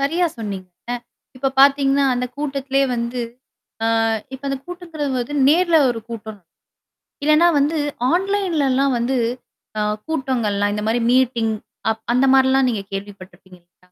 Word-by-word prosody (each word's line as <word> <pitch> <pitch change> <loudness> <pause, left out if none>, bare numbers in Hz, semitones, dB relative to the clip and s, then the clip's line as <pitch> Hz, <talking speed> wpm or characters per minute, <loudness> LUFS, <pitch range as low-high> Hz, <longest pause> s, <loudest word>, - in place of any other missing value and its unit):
சரியா 330 +6 +1
சொன்னீங்க. 195 -4 -5 0.7
இப்ப 270 +1 0
பாத்தீங்கன்னா 275 0 +4
அந்த 250 +1 -1
கூட்டத்திலேயே 275 -1 0
வந்து, 235 +1 -3 0.9
ஆ - - +1 0.3
இப்ப 265 - -10
அந்த 275 -1 -2
கூட்டம் 290 -6 -2
நேர்ல 340 +1 +4
ஒரு 230 -2 -4
கூட்டம். 220 -2 -7 0.8
இல்லன்னா 305 +3 +5
வந்து 295 +3 +1 0.4
ஆன்லைன்லலாம் 330 -9 +1
வந்து, 250 +2 0 0.6
ஆ - - +1 0.3
கூட்டங்கள்லாம் 235 -9 0
இந்த 210 - -3
மாதிரி 235 +2 +1
மீட்டிங், 240 -3 +2 0.4
அப் 220 0 -5
அந்த 255 +2 +3
மாதிரிலாம் 265 0 +4
நீங்க 220 -4 -2
கேள்விப்பட்டிருப்பீங்க 190 -2 -9
இல்லயா? 175 +1 -32
265 Hz, 125 wpm, -20 LUFS, 225-290 Hz, 0.9 s, இல்லன்னா